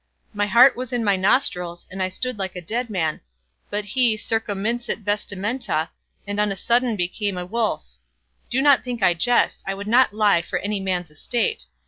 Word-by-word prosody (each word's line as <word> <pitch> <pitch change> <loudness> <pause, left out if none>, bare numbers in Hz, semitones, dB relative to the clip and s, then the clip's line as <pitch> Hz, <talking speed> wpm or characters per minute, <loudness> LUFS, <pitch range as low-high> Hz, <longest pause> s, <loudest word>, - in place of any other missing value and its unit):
My 205 0 0
heart 250 +5 +6
was 255 0 -6
in 245 -2 -1
my 200 -2 +3
nostrils, 180 -4 +1
and 190 +1 -5
I 185 - 0
stood 250 +4 -3
like 190 -1 -3
a - - -4
dead 235 +8 -3
man; 165 -7 -2 0.5
but 205 0 -2
he 235 +2 +2
"circumminxit 225 +2 -2
vestimenta", 205 -2 -2 0.4
and 205 0 -3
on 210 -1 +2
a - - -2
sudden 235 +3 +1
became 195 +1 -2
a 180 - -4
wolf. 220 - -1 0.6
Do 260 +3 +1
not 285 -3 +5
think 240 -4 -4
I 180 - +5
jest; 240 +8 +2
I 195 - -2
would 200 +1 -7
not 245 +2 +4
lie 210 -4 +3
for 175 +1 -3
any 205 +2 -2
man's 180 -4 -2
estate. 155 - -2
205 Hz, 185 wpm, -22 LUFS, 185-235 Hz, 0.6 s, heart